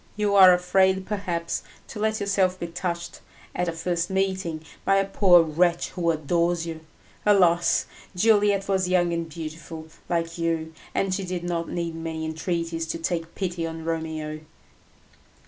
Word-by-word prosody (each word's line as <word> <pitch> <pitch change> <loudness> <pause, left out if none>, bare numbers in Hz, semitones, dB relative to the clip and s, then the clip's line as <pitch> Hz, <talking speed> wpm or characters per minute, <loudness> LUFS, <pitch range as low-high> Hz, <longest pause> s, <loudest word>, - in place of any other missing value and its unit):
You 210 -1 0
are 190 -2 +9
afraid, 190 +1 +3
perhaps, 175 -5 -2 0.3
to - - -7
let 220 0 0
yourself 195 -2 +1
be - - -3
touched, 170 0 -4 0.3
at 180 - 0
a - - 0
first 170 +1 -2
meeting, 190 -4 -1 0.2
by 195 - +3
a 195 0 +3
poor 185 -3 +5
wretch 170 +2 +1
who 170 -2 -1
adores 170 +2 +1
you. 165 -1 -5 0.4
Alas! 175 -4 +4 0.3
Juliet 205 0 +3
was 190 -2 +1
young 175 -2 +2
and 170 -1 -3
beautiful 160 0 -8 0.2
like 165 0 -1
you, 165 -1 -1 0.2
and 195 -1 +1
she 195 +1 -2
did 180 -1 -4
not 170 -1 -2
need 170 -1 -3
many 160 -1 -4
entreaties 165 0 -2
to 165 - -3
take 165 0 -3
pity 175 -3 -2
on 160 0 -7
Romeo." 160 -2 -3
170 Hz, 155 wpm, -25 LUFS, 165-190 Hz, 0.4 s, are